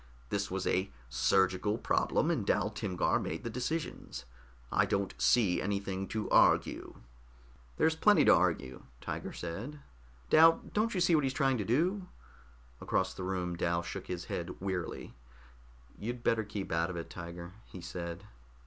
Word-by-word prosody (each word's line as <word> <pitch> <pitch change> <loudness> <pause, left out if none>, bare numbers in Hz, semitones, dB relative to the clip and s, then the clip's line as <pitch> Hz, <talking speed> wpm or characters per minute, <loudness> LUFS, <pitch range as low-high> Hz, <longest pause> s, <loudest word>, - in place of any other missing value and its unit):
"This 100 0 -1
was 95 0 -3
a 95 +2 +1 0.2
surgical 95 - +2
problem, - - +1
and - - 0
Dal - - +1
Timgar 90 -2 0
made 80 - -4
the 115 - -4
decisions. 125 - -4 0.5
I - - +3
don't 100 -1 -1
see 90 - +4
anything 100 -1 -2
to 110 -1 -3
argue." - - +3 0.8
"There's 160 0 +3
plenty 205 +6 +5
to - - +8
argue," 80 -8 +1 0.2
Tiger - - -5
said. 105 - -6 0.5
"Dal, 165 +1 +7
don't 215 +1 +1
you 180 - +1
see 175 0 +4
what 155 -3 +4
he's 135 -1 0
trying 135 -2 +2
to 105 - -2
do?" 180 - +1 0.7
Across 95 0 0
the 95 - -6
room 90 -2 -2
Dal 85 0 0
shook 85 - -6
his 90 -1 -4
head 85 +1 -5
wearily. 95 -3 -4 0.9
"You'd 120 +3 -5
better 115 -1 +2
keep 105 -2 -5
out 85 +1 +1
of 90 - -5
it, 85 - -6
Tiger," 85 0 -8 0.2
he 95 - -10
said. 85 +1 -6
95 Hz, 160 wpm, -32 LUFS, 85-125 Hz, 0.9 s, to